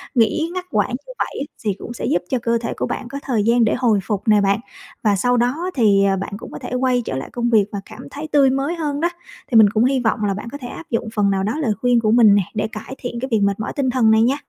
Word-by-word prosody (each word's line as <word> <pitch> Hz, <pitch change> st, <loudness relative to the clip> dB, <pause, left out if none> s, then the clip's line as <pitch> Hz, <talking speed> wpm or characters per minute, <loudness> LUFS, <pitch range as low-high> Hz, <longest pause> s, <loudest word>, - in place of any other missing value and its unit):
Nghỉ 245 Hz, +8 st, +2 dB
ngắt 365 Hz, 0 st, -4 dB
quãng 205 Hz, -1 st, +1 dB, 0.2 s
như -, -, -9 dB
vậy -, -, +1 dB
ấy 285 Hz, -, -4 dB, 0.2 s
thì 205 Hz, -, +1 dB
cũng 240 Hz, -, -7 dB
sẽ -, -, -5 dB
giúp 175 Hz, -, +1 dB
cho 260 Hz, -, 0 dB
cơ 235 Hz, 0 st, +1 dB
thể 230 Hz, -, -3 dB
của -, -, -1 dB
bạn 250 Hz, -, -4 dB
có 275 Hz, +3 st, -6 dB
thời 235 Hz, -6 st, 0 dB
gian 235 Hz, +2 st, +3 dB
để 220 Hz, -, +2 dB
hồi 230 Hz, -5 st, +2 dB
phục 200 Hz, 0 st, -2 dB
nè 210 Hz, -1 st, +5 dB
bạn, 200 Hz, +1 st, +2 dB, 0.4 s
và 210 Hz, -2 st, +3 dB
sau 245 Hz, +5 st, +1 dB
đó 285 Hz, +10 st, 0 dB
thì, 205 Hz, -6 st, +4 dB
ờ, 195 Hz, -1 st, +2 dB
bạn 195 Hz, +2 st, -5 dB
cũng -, -, -10 dB
có -, -, -7 dB
thể 250 Hz, -1 st, -7 dB
quay 250 Hz, -1 st, +1 dB
trở -, -, -3 dB
lại 135 Hz, -, -6 dB
công 240 Hz, -1 st, -1 dB
việc 215 Hz, -4 st, +4 dB
và 200 Hz, -, -4 dB
cảm -, -, -11 dB
thấy 295 Hz, +2 st, -6 dB
tươi 280 Hz, -2 st, +5 dB
mới 275 Hz, +5 st, -1 dB
hơn 295 Hz, -3 st, -2 dB
đó. 340 Hz, -, +1 dB, 0.4 s
Thì 235 Hz, -, +5 dB
mình 215 Hz, -2 st, +8 dB
cũng 220 Hz, +3 st, +2 dB
hy 265 Hz, 0 st, +2 dB
vọng 220 Hz, -3 st, 0 dB
là 200 Hz, -1 st, +1 dB
bạn 210 Hz, +4 st, -6 dB
có 285 Hz, -, -6 dB
thể 255 Hz, -4 st, -8 dB
áp 330 Hz, -, -9 dB
dụng 230 Hz, -1 st, -2 dB
phần 205 Hz, -2 st, +2 dB
nào 190 Hz, -1 st, 0 dB
đó 210 Hz, -, -1 dB
lời 245 Hz, -9 st, +1 dB
khuyên 245 Hz, -1 st, +3 dB
của 215 Hz, -1 st, +1 dB
mình 225 Hz, -4 st, +6 dB
nè, 200 Hz, -, +3 dB
để 215 Hz, -1 st, -1 dB
cải 220 Hz, +5 st, -8 dB
thiện 245 Hz, -2 st, -5 dB
cái 260 Hz, -, -3 dB
việc 220 Hz, -, +3 dB
mệt 200 Hz, 0 st, +1 dB
mỏi 215 Hz, -, -4 dB
tinh 275 Hz, -3 st, 0 dB
thần 240 Hz, -3 st, +3 dB
này 220 Hz, -, +5 dB
nha. 250 Hz, +4 st, +3 dB
235 Hz, 305 wpm, -20 LUFS, 210-260 Hz, 0.4 s, mình